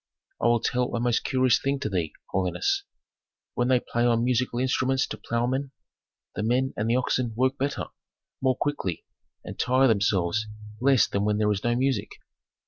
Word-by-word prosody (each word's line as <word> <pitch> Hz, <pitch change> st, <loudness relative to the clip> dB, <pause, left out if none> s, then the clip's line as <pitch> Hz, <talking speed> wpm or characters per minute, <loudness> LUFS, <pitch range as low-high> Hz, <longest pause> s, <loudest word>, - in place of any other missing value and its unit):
"I -, -, +3 dB
will 120 Hz, 0 st, +4 dB
tell 125 Hz, -1 st, 0 dB
a -, -, -1 dB
most 120 Hz, 0 st, +1 dB
curious 130 Hz, -2 st, +3 dB
thing 140 Hz, 0 st, 0 dB
to -, -, -1 dB
thee, 85 Hz, -6 st, -2 dB, 0.2 s
holiness: 385 Hz, -, 0 dB, 0.7 s
When 120 Hz, -, 0 dB
they 130 Hz, -1 st, +4 dB
play 120 Hz, 0 st, -2 dB
on 120 Hz, -1 st, +3 dB
musical 125 Hz, 0 st, 0 dB
instruments 130 Hz, +1 st, +1 dB
to -, -, -7 dB
ploughmen, 125 Hz, +4 st, -1 dB, 0.6 s
the -, -, -3 dB
men 125 Hz, +4 st, +1 dB
and 105 Hz, +2 st, -1 dB
the 120 Hz, -, +3 dB
oxen 125 Hz, -2 st, 0 dB
work 130 Hz, +3 st, +1 dB
better, 140 Hz, +1 st, -1 dB, 0.6 s
more 130 Hz, -1 st, +2 dB
quickly, 95 Hz, -, -2 dB, 0.4 s
and -, -, -9 dB
tire 130 Hz, +1 st, +3 dB
themselves 100 Hz, -1 st, +1 dB, 0.3 s
less 130 Hz, -2 st, +4 dB
than 100 Hz, -, -2 dB
when 105 Hz, 0 st, +1 dB
there 105 Hz, 0 st, +2 dB
is 100 Hz, -1 st, -2 dB
no 120 Hz, 0 st, +1 dB
music. 130 Hz, -4 st, 0 dB
120 Hz, 175 wpm, -26 LUFS, 110-130 Hz, 0.7 s, will